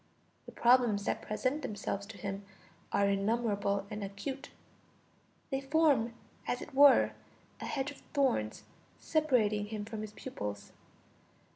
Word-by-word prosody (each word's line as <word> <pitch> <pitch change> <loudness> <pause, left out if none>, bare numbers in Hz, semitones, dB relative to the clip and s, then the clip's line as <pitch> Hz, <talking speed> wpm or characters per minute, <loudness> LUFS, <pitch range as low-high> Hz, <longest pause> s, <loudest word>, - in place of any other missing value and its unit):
The - - -8
problems 235 -5 +4
that - - -1
present 255 +7 -1
themselves 205 -3 -3
to 210 -1 -10
him 195 -1 -4 0.5
are 200 - +3
innumerable 200 -1 +1
and 210 0 -4
acute; 265 +8 -5 1.0
they 270 0 0
form 275 -5 +3 0.3
as 245 - 0
it 295 - -9
were 280 0 +7 0.5
a - - -5
hedge 275 0 -2
of 285 - -12
thorns 255 - +1 0.4
separating 230 -10 +2
him 210 -1 -4
from 220 0 -5
his 215 -1 -7
pupils. 105 - -6
220 Hz, 130 wpm, -32 LUFS, 200-270 Hz, 1.0 s, were